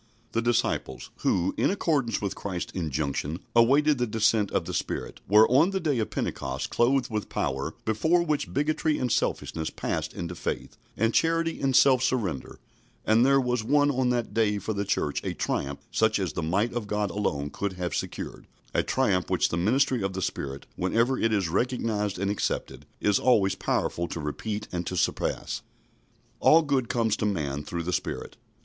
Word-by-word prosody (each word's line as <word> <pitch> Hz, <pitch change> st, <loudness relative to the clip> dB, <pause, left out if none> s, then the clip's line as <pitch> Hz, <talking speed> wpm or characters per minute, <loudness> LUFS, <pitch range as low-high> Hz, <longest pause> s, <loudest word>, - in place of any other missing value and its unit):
The 115 Hz, -, 0 dB
disciples, 115 Hz, -, -1 dB
who, 90 Hz, +1 st, +1 dB
in -, -, +3 dB
accordance 145 Hz, -, 0 dB
with 100 Hz, -, -1 dB
Christ's 95 Hz, -3 st, -5 dB
injunction, 75 Hz, -2 st, -2 dB, 0.2 s
awaited 140 Hz, +5 st, +5 dB
the 120 Hz, -, +1 dB
descent 110 Hz, -1 st, +2 dB
of -, -, -1 dB
the -, -, -5 dB
Spirit, -, -, -3 dB
were 105 Hz, +3 st, +7 dB
on 140 Hz, +8 st, +4 dB
the 195 Hz, -1 st, -1 dB
day 150 Hz, -8 st, 0 dB
of 110 Hz, -, -1 dB
Pentecost 65 Hz, 0 st, -3 dB
clothed 125 Hz, +1 st, +2 dB
with 105 Hz, -2 st, -3 dB
power 70 Hz, +1 st, -2 dB
before 160 Hz, +11 st, +2 dB
which 150 Hz, -3 st, -1 dB
bigotry 150 Hz, +2 st, +1 dB
and 125 Hz, -2 st, -1 dB
selfishness 80 Hz, -1 st, -1 dB
passed -, -, -3 dB
into 85 Hz, 0 st, -4 dB
faith 85 Hz, -, -4 dB, 0.2 s
and 115 Hz, +1 st, +2 dB
charity 165 Hz, 0 st, +1 dB
and 135 Hz, -2 st, +1 dB
self 130 Hz, -2 st, +6 dB
surrender; 105 Hz, -, -1 dB, 0.5 s
and 110 Hz, +2 st, +4 dB
there 135 Hz, +1 st, +5 dB
was 125 Hz, -3 st, 0 dB
won 145 Hz, +4 st, +3 dB
on 130 Hz, -2 st, +1 dB
that 120 Hz, -2 st, -1 dB
day 105 Hz, -2 st, +2 dB
for 105 Hz, +2 st, -3 dB
the 100 Hz, 0 st, -2 dB
Church 75 Hz, -7 st, -1 dB
a -, -, -3 dB
triumph 70 Hz, 0 st, -2 dB
such 110 Hz, -1 st, +2 dB
as 95 Hz, -3 st, -2 dB
the -, -, -2 dB
might 95 Hz, +9 st, 0 dB
of 120 Hz, -4 st, -3 dB
God 105 Hz, -2 st, -1 dB
alone 75 Hz, -8 st, -2 dB
could 100 Hz, +4 st, -3 dB
have 90 Hz, -2 st, -3 dB
secured -, -, -5 dB, 0.3 s
a -, -, +3 dB
triumph 100 Hz, -9 st, +1 dB
which -, -, +2 dB
the -, -, -2 dB
ministry 120 Hz, +7 st, +2 dB
of 95 Hz, 0 st, -2 dB
the 95 Hz, -, -3 dB
Spirit, 70 Hz, -3 st, -4 dB
whenever 115 Hz, +8 st, +1 dB
it 115 Hz, -, +2 dB
is 100 Hz, -5 st, +1 dB
recognised 105 Hz, 0 st, -1 dB
and 100 Hz, +2 st, 0 dB
accepted, 105 Hz, -, -3 dB
is 105 Hz, -1 st, +2 dB
always 100 Hz, -7 st, +3 dB
powerful 85 Hz, -2 st, -1 dB
to 85 Hz, -, -5 dB
repeat 105 Hz, +8 st, -4 dB
and 85 Hz, -1 st, -3 dB
to 90 Hz, -, -3 dB
surpass. -, -, -1 dB, 0.8 s
All 165 Hz, +1 st, +6 dB
good 135 Hz, -5 st, 0 dB
comes 115 Hz, -3 st, +1 dB
to -, -, -1 dB
man 75 Hz, -7 st, -2 dB
through 85 Hz, +1 st, -4 dB
the 90 Hz, +2 st, -2 dB
Spirit. -, -, -3 dB
110 Hz, 185 wpm, -27 LUFS, 90-125 Hz, 0.8 s, were